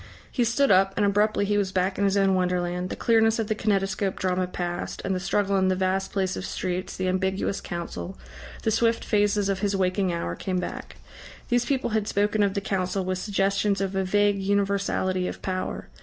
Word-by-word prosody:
He 245 - +1
stood 240 +4 +2
up, 195 +1 +4
and 205 - +3
abruptly 205 +1 +2
he 205 0 +1
was 195 -2 -1
back 190 +1 0
in 200 - +3
his 200 0 +2
own 195 -1 +3
wonderland. 180 -1 0
The - - -4
clearness 225 -1 +3
of 225 - 0
the - - +3
kinetoscope 195 -2 0
drama 185 0 0
passed, 175 -1 -4
and 195 - 0
the 185 - -1
struggle 195 +1 +1
in 190 0 +3
the 185 - +2
vast 190 +1 0
place 190 -2 -1
of - - -5
streets, 185 -1 -3
the 185 - -1
ambiguous 190 +1 -1
Council, 175 +2 -6 0.5
the 220 - +1
swift 230 +1 +1
phases 205 -1 +2
of 195 -1 0
his 200 0 0
waking 185 0 +1
hour, 130 - -3
came 185 -1 -2
back. 180 - -6 0.5
These 245 0 +2
people 265 -3 0
had 215 -1 0
spoken 205 +1 +1
of 200 -1 +2
the 200 - 0
Council 190 -1 -1
with 185 0 -1
suggestions 200 0 +1
of 195 0 -2
a 190 - +1
vague 205 +1 +2
universality 195 -2 0
of - - -7
power. 185 -1 -3
195 Hz, 205 wpm, -26 LUFS, 185-205 Hz, 0.5 s, up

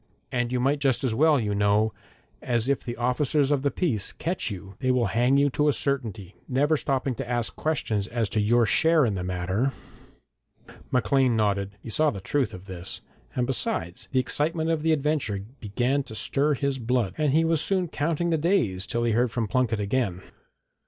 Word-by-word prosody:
And 120 -1 -1
you 125 - 0
might 140 +4 +1
just 135 -2 +1
as 125 -4 +1
well, 150 +4 +4
you 105 -3 -1
know, 105 +2 +2 0.5
as 120 0 0
if 140 0 0
the 120 -2 -5
officers 135 +4 +1
of 145 -2 +2
the 140 - +1
peace 125 - -1
catch 170 -6 -2
you 95 -1 -8
they 130 - -1
will 125 -2 +3
hang 125 +4 +3
you 140 0 +3
to 150 +3 +1
a 145 - +4
certainty, 110 -11 -2
never 145 +4 +2
stopping 135 -2 -1
to 120 - -6
ask 120 -2 -1
questions 110 -10 -1
as 115 -2 -1
to 110 - 0
your 115 +3 +3
share 160 +6 +4
in 110 - 0
the 90 -2 -3
matter.' 95 +8 -1 1.2
Maclean 125 +1 +2
nodded. 100 -2 0
He 115 - -7
saw 155 +6 +3
the 100 - -5
truth 130 +4 -1
of 90 +1 -10
this, 95 -1 -6 0.3
and 125 - +1
besides, 90 -9 -2
the 130 - +2
excitement 160 +5 0
of 160 -2 0
the 160 +1 +2
adventure 140 -10 0
began 120 +7 0
to 110 - -9
stir 145 +6 +2
his 140 0 -1
blood, 120 -3 0
and 150 -3 +1
he 160 +3 +3
was 165 -2 +2
soon 185 0 +1
counting 165 +3 -1
the 160 - +1
days 145 - +1
till 120 0 -1
he 120 - +1
heard 120 +3 +2
from 115 -1 -2
Plunket 125 -2 0
again. 100 -3 -1
125 Hz, 200 wpm, -26 LUFS, 110-145 Hz, 1.2 s, well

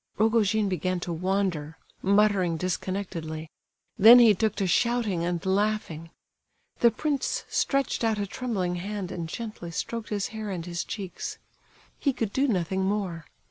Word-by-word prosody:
Rogojin 220 -1 +3
began 185 0 -1
to 175 - -3
wander—muttering 185 +1 0
disconnectedly; 170 -3 -4 0.5
then 230 +5 +10
he 235 -3 +7
took 215 +2 0
to 195 - -1
shouting 215 -2 +1
and 175 0 -2
laughing. 190 -4 -1 0.7
The 235 - +6
prince 280 +4 -2
stretched 275 -3 0
out 225 -2 +2
a 205 - -1
trembling 195 -5 -2
hand 195 0 -4
and 165 -2 -5
gently 215 -4 -6
stroked 225 +6 -4
his 205 -2 -2
hair 220 -1 -5
and 175 -4 -4
his 175 0 -3
cheeks—he 210 - -6
could 225 -4 -3
do 275 +2 +2
nothing 190 -3 0
more. 190 -5 -2
195 Hz, 140 wpm, -27 LUFS, 175-220 Hz, 0.7 s, then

